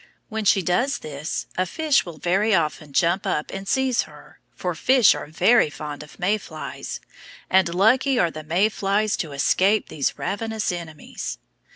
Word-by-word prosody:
When 220 -1 -3
she 195 -1 +4
does 245 - +1
this 150 +2 -5
a 185 - +1
fish 300 - +1
will 165 -3 -8
very 195 +6 +2
often 155 -3 -1
jump 175 +5 +1
up 150 - -1
and 195 0 -6
seize 265 0 +2
her, - - -16 0.2
for 180 -1 -3
fish 250 +7 +5
are - - -6
very 180 +5 +4
fond 150 -1 -7
of 150 - -13
May 205 +4 +1
flies, 155 -5 -7 0.5
and 185 -2 +3
lucky 250 +7 +3
are 175 -6 +2
the 155 - -7
May 175 +7 +2
flies 205 0 0
to 160 -5 -4
escape 190 +9 +2
these 140 -3 -2
ravenous 220 +1 -2
enemies. 170 -3 -6
185 Hz, 170 wpm, -23 LUFS, 160-215 Hz, 0.5 s, fish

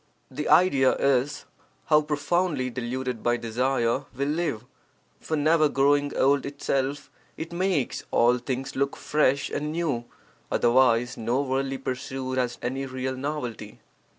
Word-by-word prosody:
[The 150 +3 -3
idea 140 -8 +5
is: 140 0 +1 0.4
How 155 -1 +5
profoundly 150 -2 0
deluded 125 -1 -4
by 120 0 +1
desire 120 +2 0
we 140 - 0
live! 150 -7 -2 0.5
For 160 - -2
never 155 +1 +3
growing 145 +1 +2
old 140 +1 +3
itself, 140 0 -2 0.3
it 165 +1 -6
makes 180 -6 0
all 120 +1 +3
things 130 +2 -4
look 140 +1 0
fresh 140 -2 +1
and 150 +1 -2
new, 155 -8 -1 0.5
otherwise 120 0 +3
no 120 +5 0
worldly 135 0 -1
pursuit 130 0 -3
has 125 -1 -1
any 135 +2 -2
real 130 0 -3
novelty. 130 -6 -5
135 Hz, 130 wpm, -26 LUFS, 125-145 Hz, 0.5 s, idea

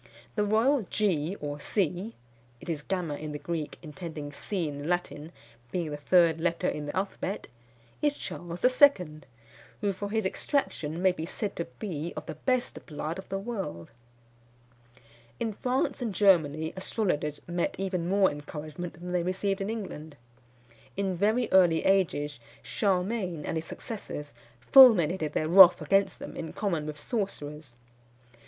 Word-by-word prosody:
The 210 - +1
royal 220 +2 +2
G 185 -3 0
or 145 0 -4
C 195 +5 -1 0.4
[it - - -13
is 155 -3 -2
gamma 175 -2 -2
in 150 0 -6
the - - -3
Greek, 160 -1 -4
intending 155 -2 -7
C 175 +3 -2
in 145 -1 -6
the 145 - -5
Latin, 170 -3 -2 0.4
being 170 -4 -2
the - - -3
third 165 +1 +4
letter 170 -1 0
in 150 -1 -3
the 145 - -4
alphabet] 195 0 -3 0.6
is 295 -1 +2
Charles 175 +3 -5 0.2
II., 180 - +5 0.6
who 200 -2 +1
for 200 +2 -5
his 220 -1 0
extraction 180 - -1
may 190 - +6
be 165 -2 -5
said 205 +2 -3
to 170 - -3
be 170 -5 -4
of - - -5
the - - -5
best 250 - -1
blood 155 +3 -4
of 190 - -10
the 195 - -2
world._" 195 - -5 1.5
In 225 -2 -1
France 255 +4 -1
and 225 -5 -2
Germany 160 -6 +3
astrologers 180 -7 -1
met 175 0 -1
even 185 -3 -2
more 195 0 +4
encouragement 150 +3 -7
than 175 +1 -8
they 180 -1 +1
received 190 +3 -1
in 195 - -2
England. 160 -9 -6 0.8
In 195 -2 0
very 215 +6 +2
early 175 -4 +5
ages 155 -8 +1 0.2
Charlemagne 185 -4 -1
and - - -2
his 160 0 -2
successors 155 -8 -6 0.3
fulminated 175 - +6
their 155 - 0
wrath 180 +1 +9
against 195 0 +2
them - - -8
in 165 - -6
common 170 -7 -1
with 150 -1 -6
sorcerers. 150 - -4
180 Hz, 155 wpm, -28 LUFS, 155-200 Hz, 1.5 s, wrath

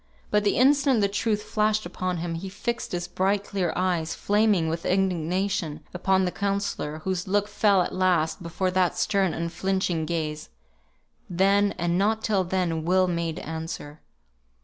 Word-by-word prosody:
But 210 0 +3
the 205 - +1
instant 270 -1 +4
the 200 - +3
truth 210 +1 -1
flashed 215 0 0
upon 180 0 -3
him, 170 0 -3
he 180 +4 -5
fixed 235 +5 -4
his 175 -1 -3
bright 195 +2 0
clear 185 -5 -1
eyes, 175 -3 0
flaming 205 -5 +2
with 165 +1 -3
indignation, 185 -2 0
upon 190 +1 +2
the 180 - -1
counsellor, 195 -7 -2
whose 185 -1 -2
look 205 +1 +1
fell 205 -2 +3
at - - -5
last 175 -4 +1
before 185 +2 -2
that 185 -1 +1
stern 195 -3 +1
unflinching 170 0 -1
gaze. 155 -2 -3 0.8
Then, 195 +3 +2
and 175 0 0
not 220 +2 +1
till 200 -3 +2
then, 175 -3 -1
Will 185 +2 +3
made 170 -2 -2
answer. 160 -2 -6
185 Hz, 155 wpm, -25 LUFS, 170-200 Hz, 0.8 s, instant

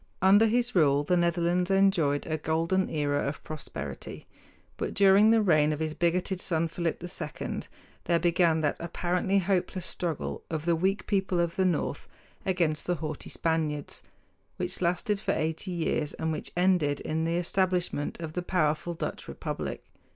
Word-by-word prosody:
Under 200 +4 +6
his 240 +2 +1
rule 145 -5 +4
the 180 +5 +2
Netherlands 175 +1 +1
enjoyed 195 -7 +3
a 155 -1 -2
golden 165 +5 0
era 145 -2 0
of 140 - -5
prosperity; 155 -2 -6 0.5
but - - -4
during 200 +2 +6
the 225 -1 +4
reign 155 -5 +4
of 150 - -2
his 155 -1 -1
bigoted 180 +3 0
son, 165 -1 0
Philip 165 0 -3
II, 175 +1 -4 0.5
there 170 - +3
began 170 -1 +2
that 145 -2 0
apparently 180 +3 0
hopeless 185 -1 0
struggle 165 -4 -3
of 160 -1 -3
the 170 -1 +3
weak 190 +4 0
people 190 -3 0
of 170 -1 0
the 190 - +2
north 165 -5 -1 0.4
against 170 -5 +1
the 175 - +1
haughty 155 -2 -5
Spaniards, 155 -3 -2 0.6
which 180 +1 -1
lasted 180 +4 +1
for - - 0
eighty 160 +4 -2
years 160 -4 -1
and 160 0 -2
which 155 - -5
ended 175 -6 +2
in 160 +1 -2
the 165 +1 0
establishment 180 -4 0
of 160 -2 -6
the 180 - -2
powerful 170 -1 0
Dutch - - -5
republic. - - -5
170 Hz, 160 wpm, -28 LUFS, 155-185 Hz, 0.6 s, Under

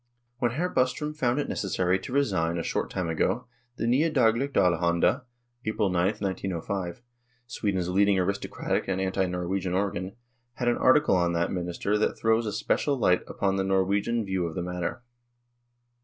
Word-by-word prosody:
When 120 -2 +1
Hr. 170 +7 0
Bostrom 130 +1 0
found 125 -4 0
it 145 - -1
necessary 95 -1 0
to 95 - -8
resign 95 -12 +1
a 85 - -2
short - - -2
time 90 - -2
ago, 85 +9 0 0.3
the - - -4
Nya 140 +8 +3
Dagligt 130 0 +2
Allelianda 85 - +2 0.4
(April 110 -3 0
9, 90 +4 +1
1 100 -3 -1
95\ 95 +1 -4 0.4
Sweden's 100 -7 -2
leading 100 +2 +3
aristocratic 100 +2 -1
and 95 -1 -1
anti 95 0 0
Nor 90 0 -3
wegian 95 0 -1
organ 95 0 -2 0.4
had 125 - -3
an 120 - +3
article 140 -3 +4
on 85 -1 +2
that 85 0 0
minister 90 +3 -1
that - - 0
throws 110 0 +2
a - - -1
special 140 +6 0
light 90 -7 +3
upon 95 -1 -1
the 95 - +1
Swedish 100 +4 +1
view 95 -3 -1
of 80 - -7
the 90 - -2
matter. 90 +7 -4
95 Hz, 170 wpm, -27 LUFS, 90-120 Hz, 0.4 s, article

